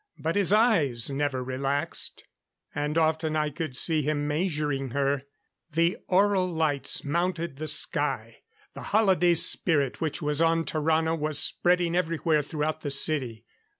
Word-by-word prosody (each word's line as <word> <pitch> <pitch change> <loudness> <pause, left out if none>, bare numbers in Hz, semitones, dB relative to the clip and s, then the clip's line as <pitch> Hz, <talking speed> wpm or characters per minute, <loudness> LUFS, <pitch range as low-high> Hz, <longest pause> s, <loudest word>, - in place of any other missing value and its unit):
But 160 +2 -3
his 200 -2 +3
eyes 165 - +2
never 135 -2 -2
relaxed; 135 +5 -3 0.5
and 150 +2 -3
often 160 -1 0
I 150 -1 -1
could 150 -4 -5
see 160 +1 +3
him 145 0 -2
measuring 150 -4 -2
her. 140 +1 -1 0.5
The 170 +3 +1
aural 190 -1 +1
lights 155 -4 0
mounted 170 -1 -2
the 155 +2 -5
sky. 150 - +1 0.4
The - - -10 0.2
holiday 185 -5 +3
spirit 145 -4 +3
which 160 -3 -2
was 150 0 -1
on 165 0 +1
Tarrano 160 +1 0
was 155 -2 -2
spreading 175 +2 +2
everywhere 165 -3 0
throughout 155 +1 -4
the 145 - -4
city. 135 -6 0
155 Hz, 140 wpm, -26 LUFS, 145-170 Hz, 0.5 s, his